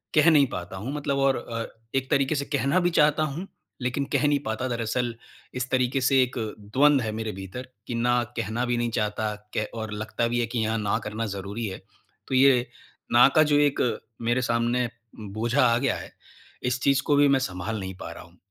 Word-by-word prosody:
कह 155 +2 +6
नहीं 145 -3 +5
पाता 90 -3 -6
हूँ 110 +8 -5
मतलब 145 -1 -1
और 135 -1 +3
अ, 115 -1 -4 0.3
एक 130 -1 0
तरीके 140 +2 +2
से 140 -1 -1
कहना 140 +4 +1
भी 175 -1 +2
चाहता 150 0 +4
हूँ, 155 +6 -4 0.3
लेकिन 125 +3 -1
कह 145 - +3
नहीं 145 -1 +2
पाता 110 +4 -2
दरअसल 120 0 -1 0.4
इस 125 0 -3
तरीके 130 +1 +1
से 135 0 +4
एक 125 +1 -5 0.2
द्वंद 135 +7 +3
है 110 -2 -2
मेरे 110 0 -3
भीतर 95 +7 -7 0.2
कि 120 - -3
ना 120 +1 +2 0.2
कहना 115 +2 -1
भी 120 -1 0
नहीं 120 0 0
चाहता 105 0 -1 0.2
कह 105 - 0
और 110 -1 -4
लगता 110 +2 -2
भी 120 +1 0
है - - +1
कि 115 +1 -3
यहाँ 110 0 0
ना 105 -2 0
करना 110 +2 -3
ज़रूरी 100 +2 -4
है। 95 - -7 0.5
तो 130 - -1
ये 130 -2 +5 0.5
ना 120 +2 +8
का 155 - +7
जो 150 -1 +3
एक 145 -1 +2 0.4
मेरे 120 +2 +1
सामने 120 +1 +1 0.3
बोझा 110 +6 +1
आ 115 0 +3
गया 125 -2 +1
है, - - -9 0.5
इस 125 0 -1
चीज़ 140 +1 +3
को 145 - +3
भी 145 0 +5
मैं 135 -1 +4
सँभाल 105 -1 -3
नहीं 95 -1 -5
पा - - -6
रहा - - -9
हूँ। 85 +1 -20
120 Hz, 215 wpm, -26 LUFS, 110-135 Hz, 0.5 s, ना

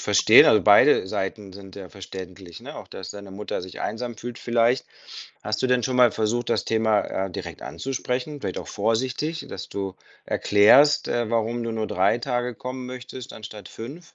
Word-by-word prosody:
verstehen, - - +6
also - - +5
beide - - +6
Seiten 100 0 -4
sind 95 0 -12
ja 95 -2 -8
verständlich, 95 -2 -10
ne? - - -9
Auch, - - -10
dass 95 - -8
deine 100 -1 -10
Mutter 100 -1 -5
sich 95 - -9
einsam 120 +2 -4
fühlt 120 +2 -7
vielleicht. 120 +1 +1 0.6
Hast 105 +2 -2
du - - +3
denn 125 -1 +2
schon 130 +1 -1
mal 125 -2 +6
versucht, 110 +3 -1
das - - +1
Thema, 110 -2 +2
äh, 95 0 -3
direkt - - -7
anzusprechen? 135 +2 -4
Vielleicht 95 - -4
auch - - -8
vorsichtig, 130 +7 -1
dass - - -7
du 95 -2 -4 0.3
erklärst, 130 +9 +5
äh, 120 -2 -1
warum 115 +1 0
du 115 - -3
nur 110 -1 -2
3 95 +5 +1
Tage 125 -1 -2
kommen 125 +2 -6
möchtest 125 0 -8
anstatt 105 -2 -10
5? 150 +9 -10
115 Hz, 180 wpm, -24 LUFS, 100-125 Hz, 0.6 s, verstehen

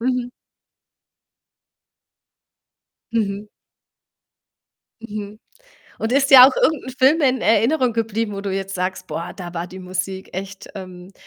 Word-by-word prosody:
Mhm. 250 0 -1 2.8
Mhm. 210 -2 -1 1.6
Mhm. 210 -1 -7 0.6
Und 225 +2 -2
ist 275 +1 +2
dir 255 -2 +11
auch 275 - +4
irgend 320 - +1
'n 260 - -6
Film 270 +5 +3
in 260 -3 +2
Erinnerung 235 +4 +2
geblieben, 225 -1 -2
wo 195 - -5
du 200 - -4
jetzt 195 0 -4
sagst: 185 0 -3
„Boah, 170 - -5
da 175 -2 -8
war 170 +1 -3
die 185 +1 -11
Musik 185 +1 -5
echt, 190 0 -7
ähm, 185 -1 -10
210 Hz, 130 wpm, -21 LUFS, 190-250 Hz, 2.8 s, dir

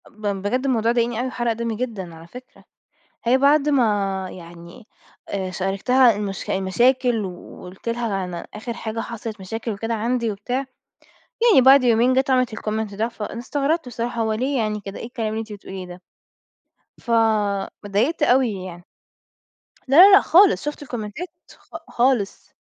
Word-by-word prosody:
ب 215 0 -7
بجد 205 +6 -1
الموضوع 230 -4 +2
ضايقني 235 -1 0
أوي 250 - -1
وحرق 240 -2 -1
دمي 230 0 -3
جدًا 210 -8 -5
على 165 +1 -13
فكرة، 250 +7 -14 0.6
هي 245 +3 +3
بعد 285 +2 +4
ما 205 -8 +1
يعني 170 +5 -12 0.4
آآ 190 -2 -3
شاركتها 200 +6 +2
المش 200 -2 -5
المشاكل، 235 +4 +1
وقُلت 180 +2 -9
لها 230 -5 -2
أنا 175 -1 -7
آخر 220 +3 -5
حاجة 225 -1 -5
حصلت 225 -2 -7
مشاكل 225 +5 -5
وكده 225 +2 -3
عندي 230 +1 -1
وبتاع، 210 +5 -4 0.9
يعني 455 - +6
بعد 265 +1 +7
يومين 240 +1 +4
جات 265 +1 +1
وعملت 255 -3 +2
الComment 215 -1 -3
ده، 220 +3 -1
فأنا 225 -1 -7
استغربت 285 +4 -1
بصراحة 235 0 -3
هو 220 -1 0
ليه 260 +6 -1
يعني 210 -1 -2
كده 195 0 -8
إيه - - -6
الكلام 235 -2 -4
اللي 220 +1 -3
أنتِ 220 -1 -8
بتقوليه 190 -2 -8
ده؟ 180 +1 -11 1.0
ف - - -8 0.7
اتضايقت 220 +12 0
أوي 255 -4 +3
يعني. 175 -1 -9 1.0
لا 270 - +1
لا 385 +4 +10
لا، 395 - +8
خالص 375 +3 +5
شُفت 295 0 -4
الكومنتات 240 - -6 0.2
خ - - -12
خالص. 240 -5 0
225 Hz, 160 wpm, -22 LUFS, 200-255 Hz, 1.0 s, لا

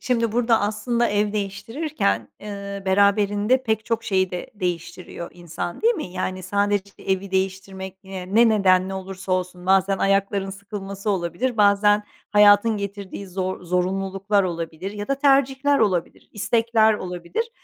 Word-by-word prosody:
şimdi, 230 -4 0
burada 235 -1 +3
aslında 225 +3 0
ev 205 0 +1
değiştirirken, 210 +5 -2
ııı, 200 -1 -6
beraberinde 205 +5 +3
pek 220 -2 -1
çok 230 -1 -2
şeyi 190 -3 +1
de 180 -1 -6
değiştiriyor 175 -2 -5
insan, 175 0 -6
değil 470 +2 +4
mi? 320 - -4
Yani 185 +1 -4
sadece 200 +1 0
evi 190 0 -2
değiştirmek, 190 0 -3
eee, 190 0 -7
ne 235 +1 +6
nedenle 190 -3 +3
olursa 190 0 -5
olsun 180 -1 -2
bazen 195 0 +3
ayakların 195 0 +1
sıkılması 200 0 -5
olabilir, 195 +7 -1
bazen 205 0 +4 0.3
hayatın 210 +1 +6
getirdiği 200 -1 -6
zor 185 0 -4
zorunluluklar 195 +3 0
olabilir 170 +1 -4
ya 205 0 -6
da 275 - +2
tercihler 275 0 +3
olabilir, 185 -6 -1
istekler 225 +1 +2
olabilir. 180 - -4
200 Hz, 135 wpm, -23 LUFS, 190-215 Hz, 0.3 s, ne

